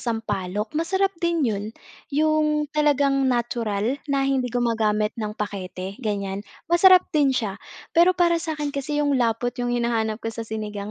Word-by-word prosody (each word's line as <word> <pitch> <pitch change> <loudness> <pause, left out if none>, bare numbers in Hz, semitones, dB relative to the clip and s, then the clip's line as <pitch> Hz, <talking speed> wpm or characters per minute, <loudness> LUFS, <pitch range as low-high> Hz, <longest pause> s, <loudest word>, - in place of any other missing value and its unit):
sampalok, 210 -3 -3
masarap 380 +5 +1
din 340 -4 +1
yun. 205 -3 -1 0.4
Yung 305 0 +2
talagang 280 -3 +2
natural, 235 0 -1
na 275 -1 +1
hindi 265 -2 +1
gumagamit 225 -3 0
ng 210 0 -4
pakete 195 0 -5
ganiyan. 200 -3 -2 0.3
Masarap 365 +1 +7
din 290 -3 +3
siya, 220 -6 -2 0.3
pero 355 +2 +5
para 340 -1 +3
sa'kin 300 -3 -3
kasi 295 +1 -2
yung 285 - +2
lapot 235 +1 0
yung 245 - -1
hinahanap 230 -2 0
ko 225 - -2
sa 230 - -5
sinigang, 210 -2 -5
245 Hz, 150 wpm, -24 LUFS, 215-300 Hz, 0.4 s, Masarap